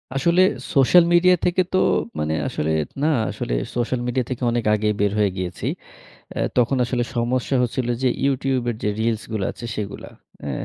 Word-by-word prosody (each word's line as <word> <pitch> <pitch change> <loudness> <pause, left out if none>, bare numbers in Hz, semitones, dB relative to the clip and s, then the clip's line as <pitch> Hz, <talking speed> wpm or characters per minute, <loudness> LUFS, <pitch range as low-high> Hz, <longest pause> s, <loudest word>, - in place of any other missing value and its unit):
আসলে 170 +7 +3 0.3
social 140 +6 +6
media 180 +1 +6
থেকে 180 +1 +2
তো - - +3 0.4
মানে 75 +1 -1
আসলে, 80 +1 -2 0.3
না - - +3 0.2
আসলে - - -4 0.2
সোশ্যাল 120 +1 -1
মিডিয়া 125 0 0
থেকে 130 -1 -4
অনেক 120 0 0
আগেই 105 0 +1
বের 100 -1 +2
হয়ে 100 -2 +2
গিয়েছি। 90 -1 -4 0.7
অ্যা - - -3 0.2
তখন 125 +2 +3
আসলে 120 0 -1
সমস্যা 120 +3 0
হচ্ছিল 125 +1 -2 0.2
যে - - +4 0.2
YouTube 135 -2 0
এর 120 - -2
যে 105 - +1
reels 110 -1 0
গুলা 100 -3 -1
আছে 120 - -9
সেগুলা, 105 -1 -5 0.4
এ্যা 70 - -3
120 Hz, 175 wpm, -22 LUFS, 105-135 Hz, 0.7 s, সোশ্যাল